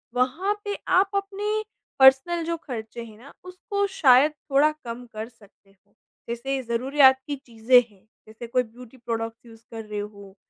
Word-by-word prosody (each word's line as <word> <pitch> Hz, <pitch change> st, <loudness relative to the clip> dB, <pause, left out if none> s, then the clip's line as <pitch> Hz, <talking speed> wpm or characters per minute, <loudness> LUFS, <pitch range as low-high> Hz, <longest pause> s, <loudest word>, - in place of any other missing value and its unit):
वहाँ 315 Hz, +12 st, +1 dB
पे 405 Hz, 0 st, -2 dB, 0.2 s
आप 390 Hz, +1 st, +2 dB
अपने 400 Hz, +1 st, -2 dB, 0.5 s
पर्सनल 270 Hz, +6 st, +5 dB
जो 335 Hz, 0 st, -2 dB
खर्चे 235 Hz, -1 st, -6 dB
हैं 215 Hz, -2 st, -13 dB
ना, 270 Hz, +5 st, -15 dB
उसको 385 Hz, +2 st, -3 dB
शायद 270 Hz, +2 st, +6 dB, 0.2 s
थोड़ा 295 Hz, +3 st, +4 dB
कम 235 Hz, +1 st, -7 dB
कर 220 Hz, +2 st, -6 dB
सकते 200 Hz, -3 st, -24 dB, 0.5 s
जैसे 265 Hz, +3 st, -3 dB
ज़रूरीयात 265 Hz, +3 st, +4 dB
की 290 Hz, -, -2 dB
चीज़ें 235 Hz, +1 st, +4 dB
हैं, 200 Hz, 0 st, -25 dB, 0.2 s
जैसे 220 Hz, +2 st, -10 dB
कोई 250 Hz, +1 st, +1 dB
ब्यूटी 245 Hz, +2 st, -15 dB
प्रोडक्टस 230 Hz, -1 st, -5 dB
यूज़ 225 Hz, -1 st, -15 dB
कर 225 Hz, -1 st, -7 dB
रहे 210 Hz, -1 st, -5 dB
हो, 200 Hz, -1 st, -9 dB
250 Hz, 160 wpm, -24 LUFS, 225-290 Hz, 0.5 s, शायद